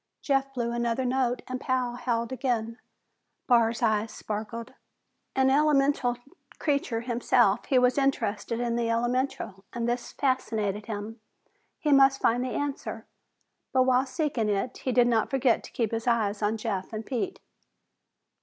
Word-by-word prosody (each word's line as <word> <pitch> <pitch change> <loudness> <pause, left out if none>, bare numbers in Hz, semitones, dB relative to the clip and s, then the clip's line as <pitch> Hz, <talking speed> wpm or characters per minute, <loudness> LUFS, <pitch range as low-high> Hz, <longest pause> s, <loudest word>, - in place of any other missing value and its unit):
Jeff 270 -1 +1
blew 235 -1 -1
another 235 +2 -1
note 250 -1 0
and 255 0 -4
Pal 255 -2 0
howled 235 -1 -2
again. 235 -3 -2 0.7
Barr's 235 -1 +3
eyes 220 -1 +1
sparkled. 220 +2 -5 0.6
An 265 0 +4
elemental 275 -4 +3 0.4
creature 280 -6 0
himself, 240 0 +2
he 265 - +2
was 250 +2 +4
interested 230 -4 0
in 235 -1 0
the 235 -1 0
elemental 235 -4 -1
and 235 -1 -2
this 240 0 -2
fascinated 215 -6 -1
him. 215 +1 -6 0.6
He 300 - 0
must 270 -1 +6
find 240 +2 +2
the 255 - -2
answer, 285 0 -4 0.7
but 260 -1 +5
while 255 +1 +3
seeking 260 -7 -1
it 205 +5 -1
he 260 - -2
did 245 0 +5
not 230 -2 +2
forget 260 -3 +2
to - - -12
keep 230 -3 -1
his 225 +1 -3
eyes 220 -3 +1
on 210 +2 +1
Jeff 205 -4 -3
and 215 0 -4
Pete. 275 +9 -3
240 Hz, 150 wpm, -27 LUFS, 225-260 Hz, 0.7 s, must